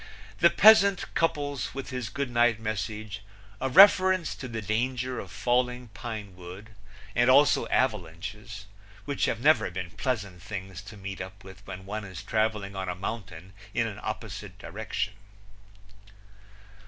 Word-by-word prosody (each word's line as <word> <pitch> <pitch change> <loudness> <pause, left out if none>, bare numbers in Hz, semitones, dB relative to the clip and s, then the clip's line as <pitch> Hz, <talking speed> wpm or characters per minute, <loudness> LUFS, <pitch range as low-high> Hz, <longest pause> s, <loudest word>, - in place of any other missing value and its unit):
The 170 - +7
peasant 200 -2 +6
couples 145 -7 -1
with 135 0 -5
his 125 -4 -3
good 140 +1 -3
night 120 -2 +3
message 110 0 -4 0.4
a 135 - -1
reference 185 +2 +6
to 130 - -7
the 115 -2 -4
danger 125 +4 -1
of - - -7
falling 125 0 0
pine 105 -3 -7
wood 90 +4 -10 0.4
and 120 +1 +4
also 140 +3 +5
avalanches, 105 -1 -2 0.4
which 140 +2 0
have 115 - -1
never 120 -8 +4
been 90 -1 -5
pleasant 100 - -3
things 95 -1 -7
to 105 +1 -10
meet 95 -1 -6
up 95 +2 -9
with 95 0 -12
when 95 +1 -8
one 105 +2 -4
is 95 -4 -8
traveling 110 -3 -1
on 95 -1 -3
a 90 - -2
mountain 95 -2 -6 0.2
in 115 - +2
an 110 -3 -5
opposite - - -6
direction. - - -4
110 Hz, 145 wpm, -28 LUFS, 95-125 Hz, 0.4 s, The